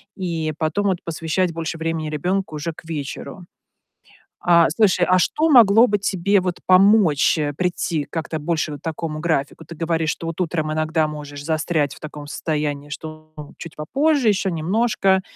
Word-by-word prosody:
и 165 -4 -3
потом 200 +6 0
вот 185 -2 +1
посвящать 165 +2 -1
больше 165 0 -4
времени 160 -1 -2
ребёнку 180 +3 -2
уже 160 +2 -4
к - - -14
вечеру. 160 +3 -6 1.0
А, 170 -1 +6
слушай, 190 -5 +3
а 185 0 +5
что 310 - +1
могло 230 -4 +7
бы 205 0 +1
тебе 195 0 +1
вот 180 -1 -3
помочь, 185 -6 +5
э, 145 -1 -1
прийти 175 -4 -1
как-то 160 -1 -4
больше 155 0 -1
вот 145 - -8
к - - -51
такому 160 -1 -4
графику? 160 -1 -2
Ты 170 +2 -10
говоришь, 165 -1 -1
что 165 - -5
вот 165 +2 -5
утром 155 -3 -1
иногда 155 0 0
можешь 145 -1 -8
застрять 155 -2 0
в - - -16
таком 150 -1 -8
состоянии, 150 -2 -3
что 155 +1 -9
ну, 150 -1 -10
чуть 165 - -9
попозже, 275 - +1
ещё 195 -2 +1
немножко. 190 +3 +1
165 Hz, 170 wpm, -21 LUFS, 155-185 Hz, 1.0 s, могло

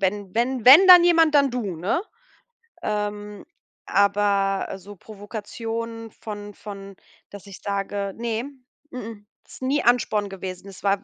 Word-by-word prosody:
„Wenn 195 0 -2
wenn 240 +1 -1
wenn 315 +9 +10
dann 360 -2 +10
jemand, 330 -3 +4
dann 280 -2 +4
du“, 220 -8 -4
ne? 185 - -1 0.8
Ähm, 210 -1 -4 0.4
aber, 200 -1 +1
äh, - - -6
so 205 +2 -12
Provokation 225 +2 -7
von 205 -1 -9
von, 200 -2 -10 0.3
dass 205 0 -12
ich 195 - -11
sage 200 0 -3
ne, 230 0 -3 0.5
mh 250 - -6
mh, 225 0 -8 0.3
ist - - -14
nie 275 +3 0
Ansporn 220 -4 +1
gewesen. 190 0 -8
Es 195 - -14
war 200 0 +1
205 Hz, 145 wpm, -23 LUFS, 200-235 Hz, 0.8 s, wenn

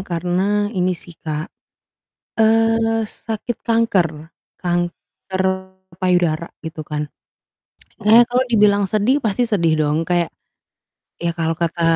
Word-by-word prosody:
karena 190 +4 0
ini 180 -3 0
sih 175 - -13
Kak, 155 +1 -4 0.9
eee, 225 0 +3
sakit 225 +2 -5
kanker, 175 -9 0 0.2
kanker 175 +2 -3 0.6
payudara 175 -3 +1 0.2
gitu 160 0 -5
kan. 150 0 -3 0.9
Kayaknya 220 +3 +7
kalau 250 +1 +3
dibilang 205 -3 +4
sedih 215 +8 +2
pasti 230 -1 0
sedih 180 -9 +2
dong 150 +2 0
kayak, 175 -1 +1 0.9
ya 170 -1 -2
kalau 165 -1 -1
kata 170 0 -1
185 Hz, 110 wpm, -20 LUFS, 170-220 Hz, 0.9 s, Kayaknya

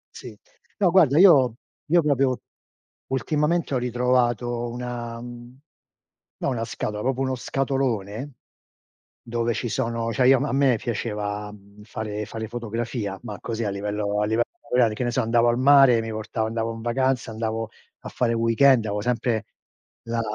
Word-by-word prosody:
Sì, - - -10 0.4
no 180 -4 +3
guarda 160 -6 +5
io 140 - +6 0.4
io 175 -1 +6
proprio 135 -4 +1 0.7
ultimamente 150 +4 0
ho - - +2
ritrovato 120 -1 0
una 120 -1 -5
mhmm, 120 +1 -10 0.8
no - - -1
una 115 -3 -2
scatola, 105 -2 -4
proprio 130 +2 -1
uno 130 -1 0
scatolone, 130 -2 -2 0.9
dove 120 -1 -1
ci 120 - -3
sono 115 +1 -2
cioè, 125 +3 +3
io 135 - +7
a - - -5
m - - 0
a - - -3
me 135 -3 +3
piaceva, 105 -2 -3
mhmm, 100 0 -16
fare 105 -1 -5
fare 110 0 -6
fotografia, 115 -3 -4
ma 105 -3 -7
così 115 -1 -3
a 100 - -1
livello 105 +1 -2
a - - +2
livello 110 +2 +1 0.2
amatoriale, 120 -3 +1
che 125 - -3
ne 120 - 0
so - - 0
andavo 115 +1 +3
al 120 - +2
mare, 135 -2 +6
e - - +1
mi 115 - -5
portavo, 110 0 -3
andavo 115 0 -2
n 115 - -8
vacanza, 130 0 0
andavo 110 0 -3 0.3
a - - -5
fare 115 -2 0
weekend, 115 +2 +4
avo 105 0 -2
sempre, 115 -1 -1 0.6
la 115 0 -2
120 Hz, 170 wpm, -24 LUFS, 110-130 Hz, 0.9 s, io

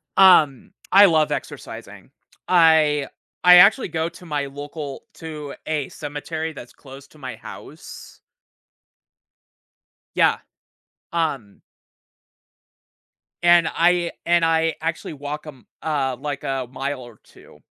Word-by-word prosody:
Um, 160 -9 +5 0.2
I 200 +1 +8
love 155 -4 +2
exercising. - - -7 0.4
I 160 -5 +4 0.4
I 180 0 +9
actually 200 +8 +6
go 160 0 -2
to 180 - -15
my 145 -3 -2
local 145 +1 -8
to 155 -3 -8
a 150 -3 -2
cemetery 155 +2 -6
that's 120 -4 -12
close 135 0 -14
to 155 - -21
my 130 -4 -7
house. - - -12 1.9
Yeah, - - +3 0.8
um 140 -11 -3 1.8
And 175 -1 +5
I 175 0 +1
and 170 0 +3
I 165 0 +1
actually 165 0 -4
walk, 145 +1 -7
um, 135 -5 -13 0.2
m - - -3
uh, 135 -4 -1
like 145 0 -5
a 135 -2 -3
mile 135 0 -4
or 120 -3 -14
2. - - -19
150 Hz, 120 wpm, -22 LUFS, 140-165 Hz, 1.9 s, I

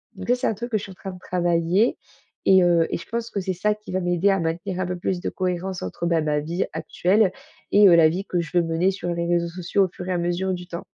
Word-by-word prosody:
donc - - -8
ça, 245 - +5
c'est 250 - -1
un - - +1
truc 240 +3 -6
que 215 - +2
je 200 - -9
suis 195 - -8
en 185 - -12
train 195 0 -7
de 180 - -11
travailler 175 +4 +1 0.5
et 190 -1 +6
heu, 170 -2 +3
et - - -1
je - - -11
pense 235 0 -3
que 200 - -2
c'est 185 0 -2
ça 210 +4 0
qui 210 -2 -11
va 185 - 0
m'aider 175 +2 +2
à 195 - +1
maintenir 175 +3 -3
un - - 0
peu 180 0 -3
plus 175 0 -2
de - - -2
cohérence 185 0 -3
entre, 95 - -4
heu, - - +1
bah, 165 -2 +2
ma 150 -1 0
vie 170 +5 -2
actuelle 190 +1 +1 0.4
et 205 0 +7
heu, 170 - +7
la 160 -2 +6
vie 185 +4 -3
que 175 -3 -1
je 170 +1 -3
veux 175 - +4
mener 165 +3 +1
sur 175 -2 -3
les 170 0 -2
réseaux 170 0 +1
sociaux 185 +3 0
au - - -5
fur 180 +1 -9
et - - +1
à - - 0
mesure 175 +2 -1
du 180 -1 -6
temps. 170 -1 -6
180 Hz, 300 wpm, -23 LUFS, 170-190 Hz, 0.5 s, et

